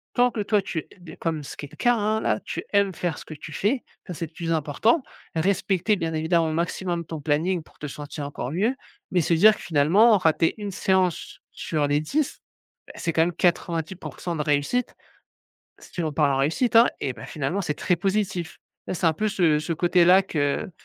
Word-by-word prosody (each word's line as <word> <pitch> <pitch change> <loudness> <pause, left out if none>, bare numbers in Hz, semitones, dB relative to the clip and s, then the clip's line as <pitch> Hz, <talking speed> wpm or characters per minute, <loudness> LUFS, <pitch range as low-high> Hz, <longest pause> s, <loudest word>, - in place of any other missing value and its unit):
tant 245 0 +4
que 225 - -4
toi 205 0 +2
tu 165 -4 -4 0.2
es 155 - -10
comme 160 -2 -2
ce - - -9
qui - - -6
est 140 - -15
le - - -14
cas, 245 - +3
hein. 215 0 0
Là 110 - +1
tu - - -5
aimes 200 -1 +3
faire 170 -2 -3
ce - - -10
que - - -8
tu 150 - -10
fais, 235 - 0 0.2
ça, 180 - -5
c'est 165 0 -4
le 155 - -26
plus 165 0 -4
important. 165 - +2 0.3
Respecter 195 +3 +1
bien 165 -4 -3
évidemment 160 +1 +1
au - - -2
maximum 170 +1 -2
ton 160 0 -6
planning, 165 +5 0
pour - - -24
te 150 - -5
sentir 145 +1 -7
encore 140 -2 -5
mieux. 210 - +1 0.4
Mais 180 - +3
se 165 - +1
dire 210 +6 +7
que - - -12
finalement, 175 +8 +4
rater 165 -2 +2
1 205 -2 -5
séance 185 -2 0
sur 155 -3 -2
les 145 +1 +2
10, 275 - -2 0.5
beh, - - -11
c'est 165 - -2
quand 160 - +3
même 175 +1 -1
90% 170 0 -2
de 155 - -2
réussite. 150 +12 0 0.9
Si 175 - -6
on 155 - -2
parle 145 -2 +2
en - - 0
réussite, 195 - +1
hein 230 +1 +8
et 130 - -1
bah, - - -10
finalement 155 +7 -2
c'est 150 -3 -2
très 180 - 0
positif. 190 -2 -2 0.3
Hein, - - -3
c'est 170 - 0
un 160 - +5
peu 215 +7 -2
ce 170 -6 +2
ce 155 +3 -3
côté-là 175 +3 +5
que 155 +1 -1
170 Hz, 215 wpm, -24 LUFS, 155-195 Hz, 0.9 s, hein